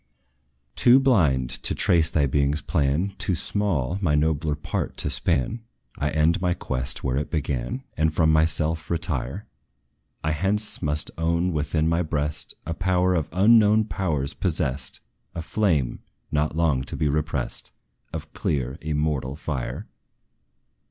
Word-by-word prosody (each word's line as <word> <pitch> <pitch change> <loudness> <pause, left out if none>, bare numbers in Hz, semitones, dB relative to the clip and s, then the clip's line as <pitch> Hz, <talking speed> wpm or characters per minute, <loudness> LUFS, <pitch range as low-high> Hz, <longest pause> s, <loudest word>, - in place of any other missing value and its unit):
Too 125 +2 +6
blind 80 - +2
to - - -1
trace 80 -3 +3
thy 75 -3 +2
being's 70 +2 +1
plan, 75 +3 0
Too 90 - 0
small 90 -4 -1
my 75 -6 +2
nobler 75 0 +1
part 75 - -4
to - - 0
span, 105 - 0 0.4
I 75 - 0
end 80 +4 +2
my 90 -1 +1
quest 65 0 -2
where 65 0 0
it 75 - -2
began, 70 - -2
And 80 0 +2
from 80 0 +3
myself 80 0 +1
retire. 80 -5 0 0.8
I 75 - 0
hence 100 +7 +1
must 75 -2 +1
own 85 +2 +1
within 75 +1 0
my 85 +1 +2
breast 75 -2 -1
A 85 - -2
power 90 +2 +1
of 80 -4 -1
unknown 105 +3 +5
powers 80 -9 -2
possessed 75 -8 -1 0.3
A 85 - -3
flame, 80 - 0 0.3
not 75 0 0
long 80 -6 +1
to - - -4
be 75 +1 +1
repressed, 75 -3 -2 0.4
Of - - -7
clear 65 +1 -2
immortal 75 -3 -1
fire. 70 -5 -4
80 Hz, 140 wpm, -24 LUFS, 70-90 Hz, 0.8 s, Too